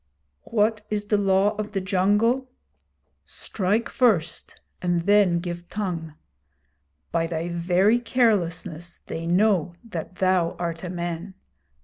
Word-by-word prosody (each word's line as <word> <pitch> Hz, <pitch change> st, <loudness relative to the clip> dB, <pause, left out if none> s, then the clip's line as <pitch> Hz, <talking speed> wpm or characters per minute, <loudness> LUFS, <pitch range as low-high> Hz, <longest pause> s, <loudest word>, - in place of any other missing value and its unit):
'What 215 Hz, -1 st, +1 dB
is 210 Hz, -1 st, -2 dB
the 210 Hz, 0 st, +2 dB
Law 195 Hz, +1 st, +3 dB
of 215 Hz, 0 st, -4 dB
the 195 Hz, -, 0 dB
Jungle? 205 Hz, +7 st, +2 dB, 0.7 s
Strike 210 Hz, +4 st, -1 dB
first 185 Hz, -10 st, 0 dB, 0.2 s
and 175 Hz, -1 st, 0 dB
then 200 Hz, -2 st, +4 dB
give 175 Hz, 0 st, -5 dB
tongue. 170 Hz, -7 st, -4 dB, 1.0 s
By 165 Hz, 0 st, +1 dB
thy 165 Hz, +1 st, -3 dB
very 180 Hz, +6 st, +3 dB
carelessness 180 Hz, -8 st, 0 dB
they 165 Hz, +1 st, -5 dB
know 180 Hz, -2 st, +2 dB
that 185 Hz, -5 st, -6 dB
thou 185 Hz, -2 st, +2 dB
art 170 Hz, -1 st, -4 dB
a 180 Hz, -, -4 dB
man. 175 Hz, +1 st, -4 dB
185 Hz, 120 wpm, -24 LUFS, 170-210 Hz, 1.0 s, then